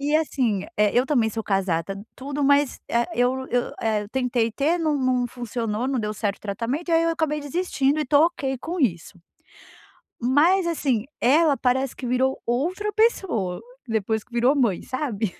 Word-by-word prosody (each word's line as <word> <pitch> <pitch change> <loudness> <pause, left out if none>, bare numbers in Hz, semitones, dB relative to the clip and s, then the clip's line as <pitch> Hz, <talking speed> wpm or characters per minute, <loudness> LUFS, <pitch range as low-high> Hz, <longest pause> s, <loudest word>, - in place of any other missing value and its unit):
E 290 +2 0
assim, 250 -10 0
eh, 210 0 +3
eu 250 - +2
também 240 -7 +2
sou 225 +1 -4
casada, 195 -1 -1 0.2
tudo, 280 +2 -4
mas, 285 -1 +3
eh, 235 0 +2
eu 255 +2 +1
eu, 245 0 -1
eh, 215 -2 0
tentei 245 -3 0
ter, 300 +9 0
não 310 -3 +1
não 255 -2 +1
funcionou, 235 -1 -3
não 270 -1 0
deu 210 -1 -2
certo 205 -1 -2
o - - -47
tratamento, 235 - -3
e - - 0
aí, 330 0 +4
eu 330 - +2
acabei 310 -2 -1
desistindo 290 -2 0
e - - +1
estou 290 +2 +4
ok 270 -6 -3
com 335 +7 -4
isso. 185 - -1 1.0
Mas 310 +10 +3
assim, 265 -9 0
ela 295 +4 +4
parece 255 +2 0
que 255 - -7
virou 260 +2 +1
outra 350 - -1
pessoa, 350 - +1 0.3
depois 220 -1 -1
que 250 - -35
virou 245 +4 +3
mãe, 235 -10 +1
sabe. 235 - -3
255 Hz, 180 wpm, -24 LUFS, 225-295 Hz, 1.0 s, aí